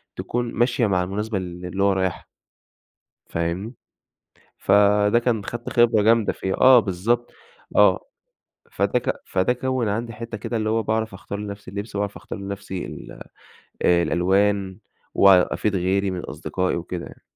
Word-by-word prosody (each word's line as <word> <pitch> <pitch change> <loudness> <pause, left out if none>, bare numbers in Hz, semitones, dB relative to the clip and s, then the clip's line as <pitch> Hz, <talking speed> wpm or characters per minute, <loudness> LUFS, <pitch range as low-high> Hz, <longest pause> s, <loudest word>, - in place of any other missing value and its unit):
تكون 120 -1 -3
ماشية 120 -1 +2
مع 90 -2 +1
المناسبة 105 +3 -3
ال 90 -1 -6
اللي 95 +3 -2
هو 100 -1 +4
رايحها. 95 -2 -2 1.1
فاهمني؟ 85 +8 -3 0.8
فده 105 +2 +4
كان 115 -4 -1
خدت 120 0 -5
خبرة 115 -3 +4
جامدة 115 0 +3
فيها، 95 0 -3
آه 130 -1 +7
بالضبط، 110 +5 -1 0.4
آه. - - +5 0.7
فده - - +1
ك - - -2
فده 95 +6 +1
كوّن 130 -2 -1
عندي 115 +3 -2
حتّه 115 0 -6
كده 115 +2 -3
اللي 110 0 -1
هو 110 0 +1
باعرف 110 0 -1
أختار 100 +2 -7
لنفسي 100 -2 -7
اللبس، 100 +1 -6
وأعرف 100 0 -2
أختار - - -8
لنفسي 100 -1 -5
ال - - -10 0.6
الألوان، 95 +3 +2 0.4
وأفيد 100 +1 +4
غيري 95 +2 +1
من 90 -1 -4
أصدقائي 90 -1 -3
وكده 85 0 -5
يعني. - - -14
100 Hz, 145 wpm, -23 LUFS, 95-115 Hz, 1.1 s, آه